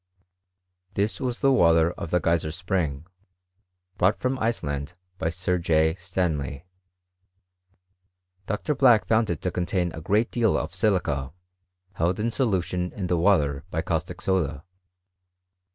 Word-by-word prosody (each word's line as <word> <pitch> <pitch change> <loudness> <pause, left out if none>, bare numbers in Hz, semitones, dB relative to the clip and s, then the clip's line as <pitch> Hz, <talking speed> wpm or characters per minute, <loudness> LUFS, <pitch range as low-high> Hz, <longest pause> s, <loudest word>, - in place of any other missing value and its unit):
TUl 105 +7 -1
was 125 0 -4
the 135 -2 +4
water 85 -8 +4
of 85 - -7
the 90 - +2
Geyser 85 -1 +1
spring, 85 -4 -2 0.9
brought 95 +4 +3
from 130 +1 -1
Ice 115 -2 -1
land 70 +3 -4 0.2
by 80 - 0
Sir 90 +2 -1
J. 80 -1 +2
Stanley. 85 -5 -3 1.8
Dr. 105 +9 -1
Black 125 -6 +5
found 110 -1 +2
it 85 - -2
to 90 - 0
con 90 0 -2
tain 90 -3 0
a 80 - -7
great 105 +8 +1
deal 115 -3 +2
of 80 +2 -4
silica, 85 -9 0 0.6
held 90 +1 0
in 115 +2 0
solution 90 -7 0
in 95 - -4
the 90 -1 +1
water 75 -7 +2
by - - -2
caustic - - -3
soda. 80 -6 0
90 Hz, 140 wpm, -25 LUFS, 80-105 Hz, 1.8 s, Black